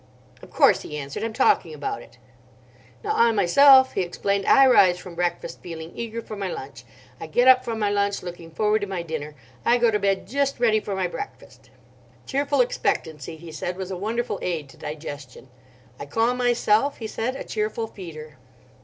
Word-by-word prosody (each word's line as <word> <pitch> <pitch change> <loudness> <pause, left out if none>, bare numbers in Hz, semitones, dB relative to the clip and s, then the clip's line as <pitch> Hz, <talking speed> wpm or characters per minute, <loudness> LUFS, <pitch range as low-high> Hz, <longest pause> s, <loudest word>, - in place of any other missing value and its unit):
"Of - - -13
course," - - +4
he 150 - -7
answered; 140 +4 -5
"I'm 225 - -2
talking 430 - +2
about 410 -2 -4
it." - - -17 0.9
"Now 425 - -1
I 235 0 +4
myself;" 260 +7 +6
he - - 0
explained—"I 200 +8 +3
rise 190 -9 +5
from 180 0 -10
breakfast 175 0 -3
feeling 165 -1 -8
eager 230 0 -5
for 215 - -8
my 200 -2 -3
lunch. 130 -7 -8 0.3
I 160 - -7
get 245 +11 +2
up 255 -1 +7
from 230 -1 -4
my 210 -2 0
lunch 200 -1 0
looking 175 -2 -8
forward 210 +5 +1
to 205 - -3
my 190 -3 -4
dinner. 155 -2 -6 0.3
I 240 - +4
go 235 -1 +3
to 210 - +1
bed 195 -1 0
just 275 +1 -1
ready 220 -3 +3
for 205 -2 -5
my 190 -1 -1
breakfast." 400 - -8 0.6
Cheerful 280 0 +1
expectancy, 160 - -2
he 165 0 -11
said, 175 +3 -4
was 190 0 -5
a - - -3
wonderful 220 +3 -3
aid 160 -6 -3
to - - -16
digestion. 145 -4 -8 0.5
"I 140 - -7
call 225 +11 +1
myself;" 245 +1 +2
he 225 - -7
said, 230 +4 -3
"a - - -6
cheerful 215 +1 -2
feeder." 155 -8 -10
200 Hz, 190 wpm, -24 LUFS, 170-235 Hz, 0.9 s, up